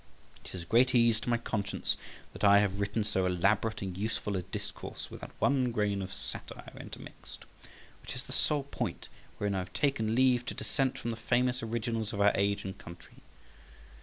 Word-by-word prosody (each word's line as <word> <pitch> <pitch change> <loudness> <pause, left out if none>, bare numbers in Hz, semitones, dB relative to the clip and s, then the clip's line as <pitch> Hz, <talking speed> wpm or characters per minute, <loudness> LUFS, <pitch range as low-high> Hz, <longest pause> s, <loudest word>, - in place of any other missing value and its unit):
It - - -9
is 90 - -5
a - - -12
great 125 +7 +4
ease 115 -2 +5
to 120 - -4
my 120 - +4
conscience 105 -3 -1 0.4
that - - -8
I 100 0 +8
have 100 -1 +2
written 100 +2 0
so 95 -3 +1
elaborate 100 +4 +2
and 95 -2 -4
useful 105 0 -2
a 95 - 0
discourse 95 - -7
without - - -7
one 130 -3 +3
grain 105 -3 +1
of 95 0 -5
satire - - -7
intermixed, - - -10 0.6
which - - -7
is - - -4
the - - -11
sole 150 -2 +1
point 140 - -4 0.3
wherein 100 -1 0
I 95 - 0
have 90 0 -6
taken 115 -6 +1
leave 125 -1 +4
to - - -3
dissent 135 -3 0
from 120 - -3
the 115 - -4
famous 125 +2 +1
originals 115 -1 -2
of 100 - -3
our 100 0 +6
age 100 0 +1
and 95 0 -4
country. 85 0 -12
110 Hz, 190 wpm, -31 LUFS, 100-120 Hz, 0.6 s, I